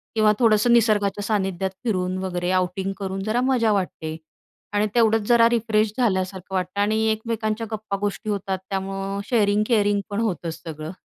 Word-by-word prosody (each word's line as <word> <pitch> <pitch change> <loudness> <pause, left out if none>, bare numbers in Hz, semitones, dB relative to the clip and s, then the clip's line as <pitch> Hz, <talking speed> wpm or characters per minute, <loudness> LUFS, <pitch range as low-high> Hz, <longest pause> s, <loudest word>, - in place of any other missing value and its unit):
किंवा 215 -1 +5
थोडंसं 230 0 +4
निसर्गाच्या 205 -3 +2
सानिध्यात 190 -3 -1
फिरून 185 -5 -1
वगैरे 180 -1 -2
आउटिंग 185 +1 0
करून 195 -1 -3
जरा 220 +4 0
मजा 250 -4 +2
वाटते 170 -5 -3 0.6
आणि 205 +1 +2
तेवढंच 225 -2 +3
जरा 235 -1 +6
रिफ्रेश 220 -2 +1
झाल्यासारखं 190 -5 -1
वाटतं 185 +2 -1
आणि 215 +1 +2
एकमेकांच्या 220 0 -2
गप्पा 215 -2 -3
गोष्टी 205 +1 -3
होतात, 195 -2 -2
त्यामुळं 195 0 -3
शेअरिंग-केअरिंग 205 -2 +2
पण 205 0 -2
होतं 175 -7 -2
सगळं 155 -1 -7
205 Hz, 145 wpm, -23 LUFS, 190-220 Hz, 0.6 s, जरा